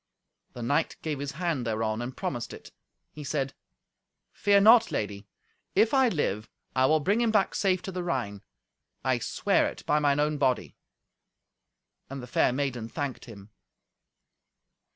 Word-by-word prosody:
The 120 - -7
knight 145 +7 0
gave 150 -3 -2
his 145 0 -4
hand 165 -4 -1
thereon, 110 -1 -1
and 125 +2 -6
promised 120 -1 -4
it. - - -12 0.4
He 150 - -9
said, 135 -1 -2 0.8
"Fear 200 -1 +3
not, 225 +2 +7
lady; 100 -1 -3 0.5
if 215 +5 +4
I 265 -2 +5
live, 110 - -2 0.3
I 130 0 +4
will 155 +2 +4
bring 200 +9 +1
him 235 - +2
back 210 -3 +2
safe 185 -2 +1
to 190 - -5
the 180 -1 -4
Rhine. 120 - -3 0.6
I 130 -1 +1
swear 115 - +1
it - - -8
by 150 - +2
mine 145 -1 +2
own 150 0 +1
body." 130 -3 0 1.3
And 135 0 -6
the 125 - -7
fair 125 - +2
maiden 125 -4 -2
thanked 145 -2 -4
him. 105 -3 -12
140 Hz, 155 wpm, -28 LUFS, 120-175 Hz, 1.3 s, not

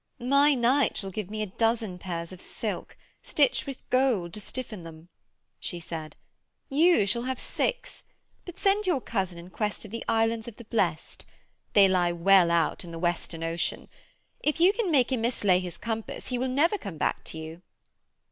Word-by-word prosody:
'My 280 +4 +4
knight 255 +3 +2
shall 195 -1 -4
give 205 0 -5
me 215 0 -3
a 195 -3 -7
dozen 225 -5 +1
pairs 170 -2 -5
of 185 - -10
silk, - - -5 0.2
stitched - - +2
with 275 -2 -8
gold 245 -10 +2
to 215 - -2
stiffen 225 -3 -5
them,' 165 0 -12 0.5
she 175 - -4
said. 160 -2 -7 0.5
'You 310 - +5
shall 210 +4 +2
have 255 +1 -3
six; - - -2 0.4
but 355 0 -10
send 400 +1 +2
your 345 -7 +2
cousin 190 -7 -2
in 170 +2 -11
quest 210 +1 -2
of 205 - -11
the 230 - -5
Islands 225 0 +1
of 235 - -8
the 235 - -12
Blest. 185 -8 -1 0.5
They 200 -2 +7
lie 180 -2 +2
well 180 +1 +5
out 170 +1 +1
in 175 - -9
the 165 - -7
Western 170 -1 -2
Ocean. 165 +1 -2 0.5
If 300 +2 0
you 365 +4 +6
can 445 -4 -1
make 270 -5 +3
him 255 -3 0
mislay 205 -6 +2
his 180 -2 -6
compass 225 -1 -4
he 250 -1 -1
will 260 +1 0
never 330 +10 +2
come 195 -7 -7
back - - -1
to - - -7
you.' 160 +2 -8
215 Hz, 185 wpm, -27 LUFS, 175-255 Hz, 0.5 s, They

